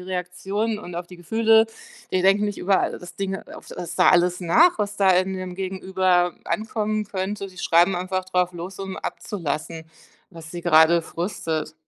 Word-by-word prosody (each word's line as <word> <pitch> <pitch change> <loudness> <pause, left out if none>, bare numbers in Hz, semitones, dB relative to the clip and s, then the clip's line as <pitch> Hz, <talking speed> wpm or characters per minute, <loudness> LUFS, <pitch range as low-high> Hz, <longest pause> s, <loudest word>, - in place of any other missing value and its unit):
Reaktionen 190 +4 -3
und 180 -4 -9
auf 175 0 -5
die 180 - -11
Gefühle, 220 +5 +3 0.5
die 185 - +2
denken 195 +2 +4
nicht 205 -1 -3
über 190 +1 +2
all - - -1
das 175 - -11
Ding 195 -1 -2
auf 205 - -12
was 175 -2 -6
da - - +6
alles 180 0 +3
nach, 225 - +4
was 205 0 -2
da 195 -1 +4
in 185 +1 +2
dem 185 -1 -6
Gegenüber 185 -2 0
ankommen 215 +2 -2
könnte. 195 +1 -4
Die 185 -1 -16
schreiben 175 +2 +3
einfach 185 +1 -2
drauf 180 -1 0
los, 180 +3 -8
um 195 -1 -5
abzulassen, 165 -3 -4 0.5
was 165 -3 -11
sie 175 - -5
grade 165 0 +5
frustet. 165 -3 -4
185 Hz, 175 wpm, -23 LUFS, 175-200 Hz, 0.5 s, da